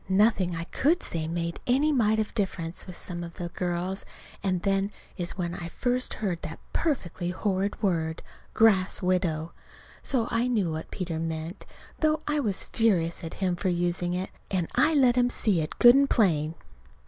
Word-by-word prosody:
Nothing 190 -3 +3
I 165 - -3
could 310 - +1
say 160 -2 -2
made 170 0 -3
a 250 +2 +4
mite 220 -6 +3
of 215 -1 -1
difference, 185 -5 -2
with 180 - -8
some 175 0 -4
of 170 0 -8
the 175 -1 -5
girls, 180 +2 -2 0.4
and 185 -3 -1
then 195 0 +1 0.2
is 175 0 -2
when 175 -2 -2
I 175 -1 -5
first 250 +7 -1
heard 185 -6 -2
that 160 +1 -6 0.2
perfectly 185 - -1
horrid 195 +3 -1
word, 160 -4 0 0.3
"grass 195 -4 +4
widow." 175 -3 0 0.5
So 240 -4 0
I 230 +1 +1
knew 210 -9 +1
what 160 0 -5
Peter 170 -4 -4
meant, 165 +2 -5 0.3
though 310 0 +2
I 300 0 0
was 210 -8 +1
furious 175 -8 +1
at 165 - -6
him 185 -2 0
for 185 +2 -1
using 175 0 0
it. 185 +1 -3 0.2
And 180 -4 0
I 315 0 +3
let 255 -4 +5
him 245 0 +4
see 205 -8 +1
it 155 - -5
good 240 0 +9
and 275 +1 +4
plain. 160 -7 +2
185 Hz, 180 wpm, -27 LUFS, 170-220 Hz, 0.5 s, good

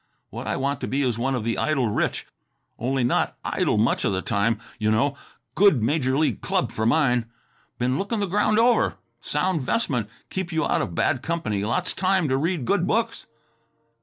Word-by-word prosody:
What - - -6
I - - 0
want 140 +1 -1
to - - -2
be 140 +2 0
is 120 -3 0
one 135 +2 0
of 120 - -2
the 115 +1 -1
idle 140 -6 +1
rich... 105 - -1 0.5
only 130 +2 0
not 120 - +1
idle - - +1
much 110 +3 +2
of - - +1
the 95 -1 -2
time, 110 +2 +1 0.2
you 110 0 +1
know. 140 +7 +2 0.4
Good 195 - +4
major 135 0 +1
league 145 -8 +1
club - - 0
for 110 +1 -1
mine. 125 -5 +2 0.5
Been 125 +2 0
looking 210 +3 -2
the 205 - +1
ground 210 +3 +1
over; 235 0 +3 0.3
sound 160 +2 0
'vestment; 125 - -1 0.2
keep 185 -2 -3
you 160 -1 0
out - - +1
of 85 - -4
bad 130 - +1
company, 130 -11 -2
lots 170 - -1
time 185 -3 +1
to 130 - +2
read 160 -2 -1
good 185 +1 +1
books." 230 +1 -1
135 Hz, 190 wpm, -24 LUFS, 115-175 Hz, 0.5 s, Good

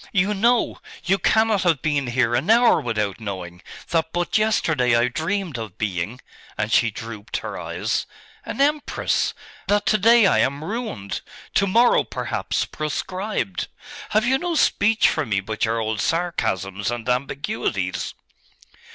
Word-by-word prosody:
You 200 +1 +2
know 235 +4 +2 0.2
you 190 +3 +2
cannot 220 -2 +3
have 165 -7 +1
been 145 -4 0
here 120 -1 +1
an 130 - 0
hour 235 +2 +5
without 105 -4 -2
knowing 95 -4 -6 0.3
that 160 -1 0
but 175 0 -2
yesterday 160 - +2
I 120 +1 +3
dreamed 165 - -2
of 110 -5 -7
being' 105 +4 -3 0.4
and 105 +1 -1
she 120 - +4
drooped 110 0 -6
her - - -6
eyes - - -2 0.4
'an - - -6
empress; 295 +1 +1 0.3
that 205 0 +2
to 215 - +3
day 230 +2 +6
I - - +4
am 140 +3 0
ruined; 210 - -4 0.3
to 200 - +3
morrow, 235 +5 +4
perhaps, - - -2
proscribed. 155 - -3 0.4
Have 215 +2 +2
you 265 +2 +2
no 350 -1 -2
speech 220 -6 +3
for 155 - 0
me 105 -7 0
but 110 +3 -2
your 115 +1 0
old 110 -1 -1
sarcasms 105 - -1
and 120 -1 -4
ambiguities? 140 - -2
150 Hz, 150 wpm, -23 LUFS, -, 0.4 s, day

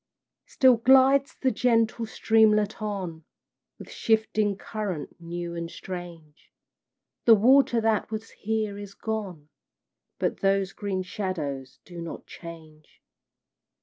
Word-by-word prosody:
Still 260 -3 +4
glides 265 +3 +5
the 260 - 0
gentle 230 -2 +1
streamlet 220 -1 +2
on, 185 -6 -4 0.5
With - - -11
shifting 215 -2 +1
current 200 -7 -5
new 170 0 -5
and 170 0 -5
strange; 170 -5 -9 0.7
The 230 - +8
water 245 +2 +4
that 220 -2 +1
was 220 +1 -6
here 215 -1 -3
is 200 -1 -9
gone, 195 -9 -5 0.7
But - - -1
those 195 -1 +1
green 195 -3 -3
shadows 150 -9 -4
do 175 -2 -9
not 170 - -7
change. 160 -3 -13
205 Hz, 115 wpm, -26 LUFS, 170-220 Hz, 0.7 s, The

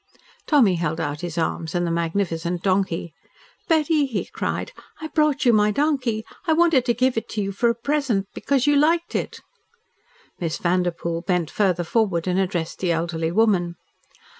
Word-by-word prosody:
Tommy 230 - +4
held 160 -1 -2
out 145 -2 -3
his 175 -2 -5
arms 160 0 -2
and 175 0 +1
the 170 - -1
magnificent 170 0 -1
donkey. 185 -4 0 0.5
"Betty," 310 -3 +2
he 225 -6 -3
cried, - - -4 0.3
"I 315 0 -6
brought 300 -3 +1
you 240 - +5
my 210 -1 +4
donkey. 250 -3 0 0.2
I 320 - +4
wanted 325 -6 +3
to 240 - +1
give 255 0 +1
it 225 - -3
to 215 - -2
you 195 - -3
for 235 +5 +1
a 235 - +1
present, 240 -5 -1
because 275 -3 0
you 290 0 +4
liked 330 +4 +2
it." - - -3 1.0
Miss 165 -2 -2
Vanderpoel 170 -1 -1
bent 180 -3 -1
further 185 -4 +1
forward 175 -3 0
and 185 0 +1
addressed 180 -4 -2
the 180 -2 0
elderly 165 0 -1
woman. 185 -4 +2
195 Hz, 170 wpm, -23 LUFS, 170-260 Hz, 1.0 s, you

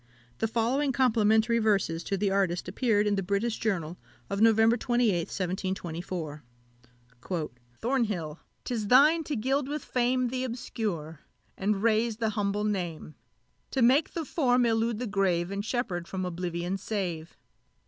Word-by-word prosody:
The 225 - +1
following 245 +6 +1
complimentary 230 -3 +3
verses 195 -7 +1
to 195 - -1
the 200 0 0
artist 190 -3 0
appeared 210 +1 +1
in 205 -1 +1
the - - +1
British 200 +5 -1
Journal 180 -6 -2 0.3
of 200 +1 -1
November 225 +1 +5
28th, 240 -9 +1
1724: 175 -4 -4 1.4
"Thornhill! 210 - -1 0.2
'tis 225 -4 -3
thine 300 +8 +6
to 295 - -2
gild 265 +4 0
with 295 0 -4
fame 250 0 +1
Th' 255 0 -2
obscure, 210 - -4 0.4
and 200 +1 -1
raise 225 0 +2
the 225 -1 0
humble 205 -1 -1
name; 175 -7 -3 0.6
To 265 - +1
make 270 +6 +4
the 330 -2 -3
form 250 -5 +2
elude 225 0 +1
the 250 - -3
grave, 190 -4 0
And 200 0 -3
Sheppard 210 -7 -2
from 185 -1 -3
oblivion 175 +1 -3
save! 180 -6 -4
210 Hz, 140 wpm, -28 LUFS, 185-240 Hz, 1.4 s, thine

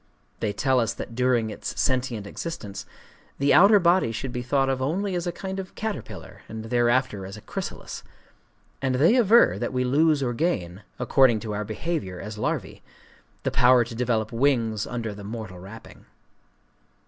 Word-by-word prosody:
They 105 - -1
tell 130 +5 +1
us 115 -2 0
that - - -7
during 120 -2 +1
its - - -6
sentient 125 -5 0
existence, 105 -3 -6 0.5
the 140 +1 +3
outer 200 +4 +7
body 175 -7 +3
should 125 +3 -4
be 125 - -3
thought 135 +2 +1
of 135 -1 -1
only 185 +9 -1
as 175 0 -2
a - - 0
kind 190 +2 -5
of 190 -1 -8
caterpillar, 220 -1 -6
and 110 0 -6
thereafter 120 -2 +1
as 95 +2 -8
a - - -11
chrysalis;—and 130 +4 -7
they 160 - +4
aver 235 -1 +5
that - - -2
we 125 -1 0
lose 145 +3 +3
or 120 -2 -1
gain, 105 - -2 0.2
according 130 -5 +4
to 110 -2 -4
our 105 +1 -2
behavior 105 - -4
as 105 +1 -7
larvæ, 105 - -3 0.6
the - - 0
power 125 0 +5
to 115 +1 -9
develop 115 -2 -1
wings 115 -4 +1
under 115 -3 -4
the 100 0 -10
mortal 105 -4 -7
wrapping. 100 +5 -12
125 Hz, 170 wpm, -25 LUFS, 110-145 Hz, 0.6 s, outer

